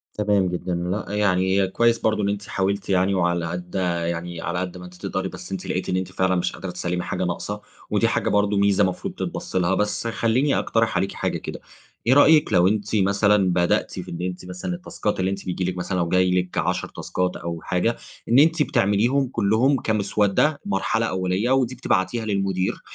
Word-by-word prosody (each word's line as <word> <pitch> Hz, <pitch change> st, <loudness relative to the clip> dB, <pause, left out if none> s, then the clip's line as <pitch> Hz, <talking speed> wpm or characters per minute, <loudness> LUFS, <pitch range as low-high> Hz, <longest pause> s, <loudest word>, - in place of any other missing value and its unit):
تمام 105 Hz, -2 st, +2 dB
جدًا، 90 Hz, 0 st, -3 dB
لأ، 90 Hz, +4 st, -2 dB
يعني 95 Hz, -1 st, +2 dB
كويس 115 Hz, +4 st, +2 dB
برضه 110 Hz, -1 st, +1 dB
إن 100 Hz, -, +1 dB
أنتِ 100 Hz, 0 st, -3 dB
حاولتِ 100 Hz, +1 st, -1 dB
يعني، 95 Hz, +1 st, +2 dB
وعلى 85 Hz, -2 st, +1 dB
قد 90 Hz, +2 st, -6 dB, 0.3 s
يعني 85 Hz, 0 st, -4 dB
على 85 Hz, +2 st, -2 dB
قد 90 Hz, 0 st, -4 dB
ما 90 Hz, -, -9 dB
أنتِ 90 Hz, -, -12 dB
تقدري، -, -, -2 dB
بس -, -, -10 dB
أنتِ -, -, -4 dB
لقيتِ -, -, -2 dB
إن 90 Hz, -, +1 dB
أنتِ 95 Hz, 0 st, -3 dB
فعلًا 95 Hz, 0 st, +1 dB
مش 90 Hz, 0 st, 0 dB
قادرة 95 Hz, -, -6 dB
تسلمي 90 Hz, 0 st, -3 dB
حاجة -, -, -3 dB
ناقصة، 105 Hz, +4 st, -4 dB, 0.3 s
ودي -, -, +2 dB
حاجة -, -, 0 dB
برضه 105 Hz, 0 st, +2 dB
ميزة 100 Hz, 0 st, +3 dB
مفروض 95 Hz, -2 st, -2 dB
تتبص -, -, -5 dB
لها. 95 Hz, +1 st, +2 dB
بس 105 Hz, +3 st, -1 dB
خلِّيني 115 Hz, +5 st, +1 dB
أقترح 115 Hz, 0 st, +1 dB
عليكِ 95 Hz, -, -1 dB
حاجة -, -, -2 dB
كده، -, -, -7 dB, 0.5 s
إيه 125 Hz, -, +6 dB
رأيكِ 150 Hz, +2 st, +5 dB
لو 90 Hz, -1 st, +5 dB
أنتِ 105 Hz, +2 st, -1 dB
مثلًا 100 Hz, 0 st, +3 dB
بدأتِ 85 Hz, 0 st, +1 dB
في -, -, -7 dB
إن 85 Hz, -, -5 dB
أنتِ 90 Hz, 0 st, -4 dB
مثلًا 90 Hz, -, -5 dB
التاسكات 115 Hz, -, -3 dB
اللي 95 Hz, +1 st, +1 dB
أنتِ 100 Hz, 0 st, -5 dB
بييجي 90 Hz, 0 st, -2 dB
لِك 90 Hz, 0 st, -2 dB
مثلًا، 90 Hz, +1 st, -2 dB
لو 85 Hz, -1 st, 0 dB
جاي 90 Hz, 0 st, +3 dB
لِك 90 Hz, -1 st, -1 dB
10 90 Hz, +2 st, 0 dB
تاسكات 90 Hz, 0 st, -2 dB
أو 85 Hz, -1 st, -5 dB
حاجة، 90 Hz, +9 st, 0 dB, 0.3 s
إن 120 Hz, +3 st, +6 dB
أنتِ 160 Hz, +1 st, +4 dB
بتعمليهم 120 Hz, +6 st, +2 dB
كلهم 120 Hz, +4 st, +2 dB
كمسودة، 105 Hz, +7 st, +1 dB
مرحلة 100 Hz, +3 st, 0 dB
أولية، 95 Hz, +4 st, 0 dB
ودي 130 Hz, -2 st, +2 dB
بتبعتيها 110 Hz, -2 st, 0 dB
للمدير، 95 Hz, -3 st, -1 dB
95 Hz, 195 wpm, -23 LUFS, 90-110 Hz, 0.5 s, إيه